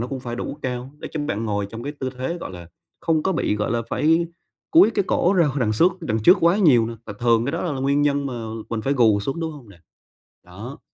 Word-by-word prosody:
nó 120 - -2
cũng 130 0 -5
phải 120 -1 -5
đủ 145 - -5
cao 125 +1 -4
để - - -7
cho 155 - -3
bạn 110 -6 -2
ngồi 105 -2 -1
trong 115 +1 -7
cái 145 - -4
tư 130 -3 -4
thế, 170 +7 -3
gọi - - -6
là, 85 -2 -10 0.3
không 160 -2 +1
có 190 - +1
bị, 105 -10 0
gọi 105 +2 -1
là, 115 0 0
phải 165 +2 +2 0.4
cúi 320 -9 +7
cái 200 -4 0
cổ 180 - +2
ra 170 -4 +4
hỏi 140 0 -2
đằng 110 -2 +1
xước 170 - +4
đằng 110 0 -1
trước 180 - +7
quá 170 +5 +4
nhiều 125 - +5
nè 115 - -5
và 105 - -5
thường 115 -1 +3
cái 140 - -2
đó - - -2
la 170 -5 -2
là 130 - -4
nguyên 140 +2 +2
nhân 140 -1 +1
mà 130 - -4 0.4
mình 110 -2 -2
phải 140 - 0
gù 110 -6 +4
xuống, 135 +10 -3
đúng 160 -1 -3
hông 135 -7 -13
nè? 90 - -16 0.7
Đó. 105 +10 -10
130 Hz, 275 wpm, -22 LUFS, 115-155 Hz, 0.7 s, cúi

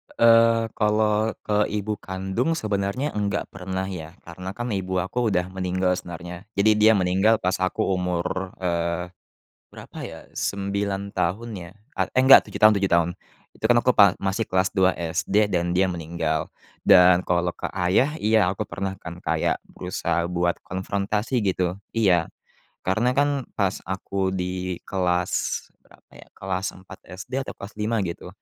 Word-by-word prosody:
Eee, 115 -1 +5
kalau 105 0 +2
ke 105 0 +1
ibu 105 0 -3
kandung 95 - -2
sebenarnya 105 +4 -2
enggak 100 -3 -1
pernah, 95 0 -4
ya. 90 -3 -7
Karena, 90 +3 -8
kan, 120 0 -4
ibu 95 -2 -1
aku 120 +5 -1
udah 90 -2 -1
meninggal 90 0 0
sebenarnya, 90 +2 -9
jadi 100 +2 +4
dia 110 +1 +7
meninggal 95 +4 +3
pas 90 0 0
aku 95 0 0
umur, 90 0 -2
eee, 85 -1 -2 0.6
berapa, - - -12
ya, - - -9
9 100 0 -2
tahun, 110 +4 -2
ya, 85 -1 -9 0.3
at - - +1
eh, 130 - +5
enggak, 135 +1 +8
7 - - -7
tahun 110 0 +9
7 95 -1 0
tahun. 85 0 +3 0.4
Itu, - - -18
kan, 120 +1 +4
aku 125 - +3
pa 100 -6 +6
masih 100 +3 -1
kelas 95 +1 +1
2 95 -2 +3
SD, 95 +5 0
dan 85 -1 0
dia 95 +1 +2
meninggal. 80 -2 -2 0.4
Dan 90 -2 +6
kalau 90 0 +1
ke - - -5
ayah, 95 +11 +2
iya, 110 -2 +4
aku - - -3
pernah, 95 0 -4
kan, 85 0 -8
kayak - - 0
berusaha 85 -1 -2
buat 85 0 0
konfrontasi, 100 +5 -2
gitu. 90 -2 0 0.2
Iya. 95 -7 +2 0.5
Karena, 120 +7 +1
kan, 145 -2 +1
pas 100 -2 0
aku 95 0 -2
di 90 -1 -3
kelas 90 -2 -1 0.2
berapa, - - -23
ya, - - -15
kelas 95 0 -3
4 95 0 -13
SD 95 +7 -10 0.2
atau - - -6
kelas 100 +1 -9
5, 110 +2 0
gitu, 85 -2 -6
95 Hz, 160 wpm, -24 LUFS, 90-105 Hz, 0.6 s, tahun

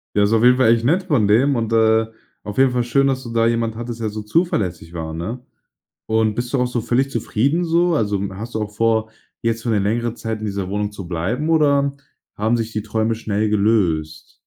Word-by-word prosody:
Ja, 105 - +4
ist 100 - +2
auf 115 0 +3
jeden 125 +1 +6
Fall 125 -3 +5
echt 115 - 0
nett 175 +8 +2
von 140 - +2
dem. 130 +7 +3
Und, 115 -2 -2
äh, 110 0 +3 0.4
auf 105 - -7
jeden 135 -1 +4
Fall 125 -1 0
schön, 135 +3 +2
dass 130 -1 0
du 120 - -7
da 115 0 +2
jemanden 115 -1 0
hattest, 120 0 -6
der 110 - -2
so 105 0 -6
zuverlässig 100 - -1
war, 80 -1 -5
ne? 110 +10 -5 0.6
Und 110 -1 +1
bist 120 +2 -4
du 135 - +1
auch 125 - +2
so 125 -1 -2
völlig 125 +4 +1
zufrieden 135 +8 0
so? 170 +1 +2
Also, 105 -8 0
hast 115 +5 -8
du 110 - -1
auch 105 - -4
vor, 110 0 +1 0.3
jetzt 115 0 -1
für 120 - -2
'ne 110 - +2
längere 115 +4 0
Zeit 110 -2 -5
in - - -5
dieser 100 -2 -3
Wohnung 105 +1 -2
zu 100 -3 -8
bleiben? 100 - -2
Oder 140 -3 +2 0.4
haben 110 +3 +1
sich 115 0 -3
die 105 - -2
Träume 110 +1 -1
schnell 110 -1 -1
gelöst? 100 -8 0
115 Hz, 230 wpm, -20 LUFS, 105-125 Hz, 0.6 s, jeden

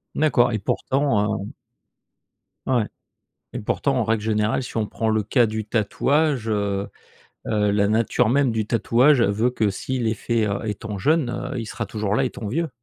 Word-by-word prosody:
D'accord 125 -6 +3
et 110 - -1
pourtant, 110 -2 0
heu - - -6 1.2
ouais, 125 -4 +2 0.7
et - - -2
pourtant, 135 +6 0
en 125 - +1
règle 110 -1 0
générale, 110 +3 0
si 125 - -8
on 110 -2 0
prend 110 - -2
le 110 -1 +2
cas 120 +4 +3
du 110 0 -3
tatouage, 125 +4 0
heu 100 -2 -1 0.6
heu, 105 -1 +1
la 100 0 +2
nature 110 +1 +2
même 135 0 +3
du 110 -1 -1
tatouage 120 +5 +3
veut 110 +3 +2
que, 110 -4 +1
s'il 120 +5 -2
est 110 - +1
fait, 115 0 -1
heu, 100 -1 -2
étant 105 -1 -4
jeune, 150 - +2
heu, 125 +1 -4
il 115 - -4
sera 115 +2 -5
toujours 105 -2 -2
là 135 - +2
étant 125 -3 -4
vieux. 160 +9 -1
110 Hz, 180 wpm, -23 LUFS, 105-125 Hz, 1.2 s, D'accord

